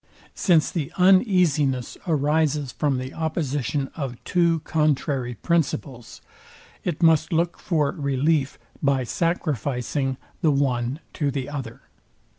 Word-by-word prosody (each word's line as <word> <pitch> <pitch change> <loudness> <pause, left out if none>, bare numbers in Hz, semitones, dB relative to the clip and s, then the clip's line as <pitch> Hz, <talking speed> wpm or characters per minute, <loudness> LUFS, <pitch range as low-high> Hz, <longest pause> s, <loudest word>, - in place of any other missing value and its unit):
Since 170 -5 +3
the 155 -6 -3
uneasiness 180 - +3
arises 150 -2 +1
from 145 -3 0
the 130 +2 -5
opposition 145 -4 -2
of 135 -6 -4
two 170 +2 +2
contrary 140 -5 0
principles, 135 - -2 0.6
it 175 -1 -2
must 160 0 +4
look 170 +1 0
for 150 -5 +1
relief 140 0 0 0.2
by 140 -2 +2
sacrificing 135 -3 -1 0.2
the 160 - +3
one 135 0 0
to 145 -3 0
the 135 -2 -3
other. 135 -6 -6
145 Hz, 110 wpm, -24 LUFS, 135-160 Hz, 0.6 s, must